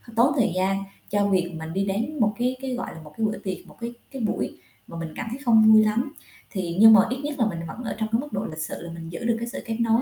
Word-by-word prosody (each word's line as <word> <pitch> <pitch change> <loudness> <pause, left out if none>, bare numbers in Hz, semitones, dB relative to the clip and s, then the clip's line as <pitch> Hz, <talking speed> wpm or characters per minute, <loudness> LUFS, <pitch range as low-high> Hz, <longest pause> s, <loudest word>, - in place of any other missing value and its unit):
tốn 250 +6 +5
thời 225 -8 +3
gian 195 +1 +1 0.3
cho 205 0 +2
việc 180 -3 +1
mình 160 +1 -6
đi 195 +1 0
đến 230 +10 -2
một 215 -2 +3
cái 250 +1 +1
cái, 265 -1 -3
gọi 245 - -5
là, 160 - -10
một 150 - -13
cái 225 - +1
bữa 215 - -1
tiệc, 190 -2 -6
một - - -16
cái 235 +1 -4 0.2
cái 265 -3 -6
buổi 215 - -2 0.3
mà 170 - -8
mình 165 -1 -5
cảm 245 - -4
thấy 250 +4 -5
không 220 -2 +7
vui 215 - +8
lắm. 240 +8 0 0.4
Thì, 180 -4 -3
nhưng 220 0 +10
mà 215 - +9
ít 255 - -1
nhất 295 -1 -4
là 230 - +4
mình 170 -6 -2
vẫn 240 +10 -7
ở 225 - -3
trong 220 0 -1
cái 225 - +3
mức 295 - -9
độ 205 +2 -1
lịch 155 0 -6
sự 160 - -4
là 170 - -7
mình 165 -1 -8
giữ 170 - -6
được 235 -1 +3
cái 235 - -3
sự 240 - -6
kết 225 -1 -3
nối. 230 +1 +3
220 Hz, 305 wpm, -25 LUFS, 185-235 Hz, 0.4 s, nhưng